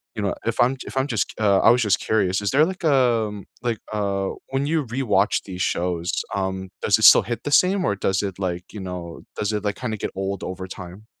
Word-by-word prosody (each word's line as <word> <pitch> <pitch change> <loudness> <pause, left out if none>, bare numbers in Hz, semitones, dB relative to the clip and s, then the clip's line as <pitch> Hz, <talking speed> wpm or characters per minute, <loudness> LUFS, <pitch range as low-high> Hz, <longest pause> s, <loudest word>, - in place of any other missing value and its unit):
you 105 - -3
know, 100 - 0
if 115 - -2
I'm 130 +2 +3
j - - -9
if - - -8
I'm 135 +2 +1
just, 110 -7 -1
uh, 100 -3 +4
I - - +5
was 125 0 +3
just 100 -3 +2
curious, 100 -3 +1
is 100 - -1
there 145 +3 +5
like, 185 0 -6
um, 115 - +2 0.2
like, 115 -3 -1
uh, 100 -2 -1 0.2
when 135 +1 -1
you 155 -3 0
rewatch 110 -5 +1
these 90 -2 -6
shows, 90 0 -1 0.2
um, 95 -1 -3
does - - +3
it - - -2
still - - +9
hit 120 +3 -4
the 145 - -3
same 185 +4 +4
or 100 - +1
does 95 0 0
it 95 -1 -4
like, 90 -2 -2
you 105 - -7
know, 90 -2 -7 0.2
does 105 0 -1
it 105 0 -2
like 100 - 0
kinda 115 -4 -3
get - - -4
old 95 0 -3
over 95 0 -5
time? 90 +4 -10
105 Hz, 240 wpm, -23 LUFS, 95-120 Hz, 0.2 s, still